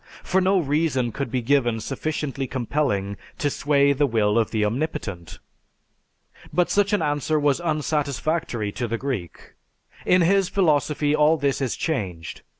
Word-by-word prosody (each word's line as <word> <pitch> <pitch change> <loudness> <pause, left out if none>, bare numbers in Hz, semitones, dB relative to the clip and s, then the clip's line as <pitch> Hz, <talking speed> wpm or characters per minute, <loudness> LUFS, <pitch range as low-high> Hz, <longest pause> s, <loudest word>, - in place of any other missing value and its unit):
For 190 - +1
no 190 +1 +3
reason 145 -5 0
could 140 +3 -4
be 125 -2 -2
given 120 -3 +2
sufficiently 135 +2 -3
compelling 115 -6 -1 0.2
to 145 -5 0
sway 140 0 +2
the 145 +1 +2
will 105 -4 +1
of 115 - 0
the 110 -2 0
Omnipotent. 105 - -4 1.1
But 180 -1 +1
such 205 +1 +2
an 205 -5 +1
answer 150 +1 0
was 145 +2 +1
unsatisfactory 150 -6 -1
to 120 +3 -3
the 115 +1 -2
Greek. 120 - -5 0.5
In 180 -1 +4
his 195 +2 +3
philosophy 150 -4 +1
all 155 +1 +4
this 140 -1 0
is 130 -3 -1
changed. 95 - -4
140 Hz, 150 wpm, -23 LUFS, 120-155 Hz, 1.1 s, In